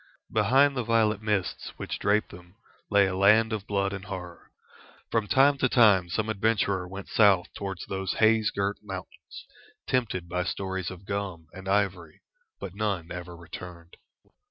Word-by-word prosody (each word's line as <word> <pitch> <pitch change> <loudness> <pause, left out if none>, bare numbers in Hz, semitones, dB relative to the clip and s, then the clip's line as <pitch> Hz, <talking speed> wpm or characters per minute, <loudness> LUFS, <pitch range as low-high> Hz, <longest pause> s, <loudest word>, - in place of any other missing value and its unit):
Behind 140 +3 +4
the 125 - -1
violet 110 -2 +2
mists 105 -3 -2
which - - -5
draped 105 +1 +1
them 90 +2 -14 0.3
lay 100 -1 +5
a 95 -1 -2
land 110 +4 +4
of 105 -2 -4
blood 100 -1 0
and 95 -1 -6
horror. 90 -3 -8 0.6
From 110 -2 +1
time 140 +3 +4
to 130 - +2
time 100 -8 +5
some 110 +5 -1
adventurer 100 -3 0
went 95 +1 -8
south 100 -4 +3
towards 95 -2 -5
those 95 -1 -3
haze 110 -1 +3
girt 100 +1 -2
mountains, 95 -3 -9 0.4
tempted 105 -9 -1
by 90 +1 -1
stories 95 -1 -3
of 95 +1 -11
gum 95 -6 -4
and 95 0 -8
ivory, 95 -5 -1 0.4
but 90 - -7
none 100 -5 -2
ever 90 0 -7
returned. 85 0 -10
100 Hz, 155 wpm, -27 LUFS, 90-110 Hz, 0.6 s, lay